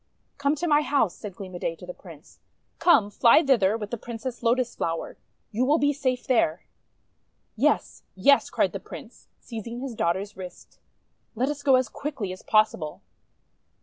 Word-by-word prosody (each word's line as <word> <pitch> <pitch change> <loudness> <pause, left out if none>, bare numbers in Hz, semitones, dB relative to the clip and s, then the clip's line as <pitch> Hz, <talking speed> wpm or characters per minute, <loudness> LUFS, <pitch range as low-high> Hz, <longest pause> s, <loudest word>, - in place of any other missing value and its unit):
"Come 285 +1 +2
to 310 - -3
my 295 -1 +4
house," 280 - +1
said 200 -4 -8
Gleam 190 -2 -9
o' 175 - -6
Day 165 - -2
to 180 - -12
the 180 - -7
Prince. 165 -5 -15 0.4
"Come, 215 - +4
fly 235 +9 +5
thither 225 -7 +3
with 210 -2 -7
the 240 - -2
Prin 235 +1 -7
cess 240 +2 -6
Lotus 245 +1 +1
Flower. 165 0 -3 0.4
You 230 +4 0
will 290 +4 +3
be 290 -2 +2
safe 255 -3 -2
there!' 185 -10 +1 0.9
'Yes! - - +1
Yes!': 280 +9 +4
cried - - +1
the - - -4
Prince, - - -12
seizing 235 0 -7
his 265 -1 -5
daughter's 195 +1 -1
wrist. 180 -2 -11 0.6
"Let 255 +5 0
us 295 -1 -4
go 270 -2 +5
as 255 -1 +2
quickly 265 -10 -5
as 185 - -11
possible." 215 -8 +1
230 Hz, 180 wpm, -26 LUFS, 190-270 Hz, 0.9 s, fly